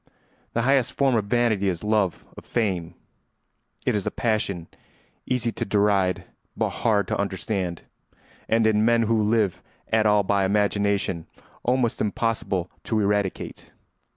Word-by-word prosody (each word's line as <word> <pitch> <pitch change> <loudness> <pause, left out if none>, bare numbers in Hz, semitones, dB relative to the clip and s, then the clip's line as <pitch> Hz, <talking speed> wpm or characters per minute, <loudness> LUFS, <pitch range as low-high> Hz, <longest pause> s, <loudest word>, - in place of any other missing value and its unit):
] - - -38
The 115 - +1
highest 135 -1 +2
form 135 -2 +2
of 110 -3 +1
vanity 110 -3 +2
is 90 0 -3
love 105 -4 0
of - - -10
fame. 90 -7 -1 0.9
It - - +2
is 100 - -2
a - - +3
passion 100 -7 -1 0.6
easy 120 -2 0
to - - -3
deride 100 -3 +2 0.3
but - - 0
hard 105 -4 +2
to - - -1
understand, 95 -3 -2 0.7
and 115 0 +3
in 110 -1 +3
men 115 0 +4
who 115 0 +2
live 105 -3 +1 0.3
at 110 -1 +4
all 105 -1 +4
by 100 0 +1
imagination 100 -3 +1 0.3
almost 125 -1 +1
impossible 105 -4 -1
to 110 - 0
eradicate. 100 -2 -2
105 Hz, 145 wpm, -24 LUFS, 95-115 Hz, 0.9 s, men